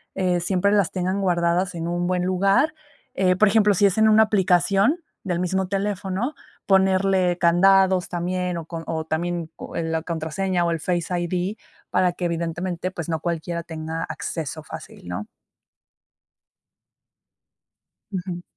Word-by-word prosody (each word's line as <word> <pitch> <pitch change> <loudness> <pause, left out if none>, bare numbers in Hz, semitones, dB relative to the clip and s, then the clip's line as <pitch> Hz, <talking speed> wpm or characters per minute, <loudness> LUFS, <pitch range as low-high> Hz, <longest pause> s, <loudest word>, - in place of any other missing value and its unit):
eh, 180 -2 +1
siempre 185 +3 +1
las 205 -3 +3
tengan 185 +1 -1
guardadas 175 0 +1
en 165 0 -3
un 175 0 -1
buen 180 0 0
lugar, 195 - +2 0.4
eh, 185 -1 +2
por 215 +3 +4
ejemplo, 210 -1 +4
si 200 - +4
es 200 +2 +2
en 220 0 +6
una 220 +1 +7
aplicación 200 - +2 0.2
del 180 -3 -1
mismo 185 +1 0
teléfono, 200 +5 -2 0.3
ponerle 190 -2 +3
candados 190 +2 +4
también, 180 0 -2
o 165 - -6
con 165 0 -6
o 165 - -2
o, 155 - -8
también, 170 +1 -2 0.2
eh, 170 - -1
la 160 0 -1
contraseña 175 +3 -1
o 170 - +1
el 165 - -1
Face 175 0 -1
ID, 180 +4 -2 0.3
para 180 -1 +2
que, 180 - -4
evidentemente, 170 +1 -2
pues, 175 -4 -6
no 160 -1 -1
cualquiera 170 0 -3
tenga 160 -1 -5
acceso 155 -1 -5
fácil, 140 - -10
¿no? 90 +4 -4 2.9
Ujú. 180 -2 -4
180 Hz, 150 wpm, -23 LUFS, 170-195 Hz, 2.9 s, una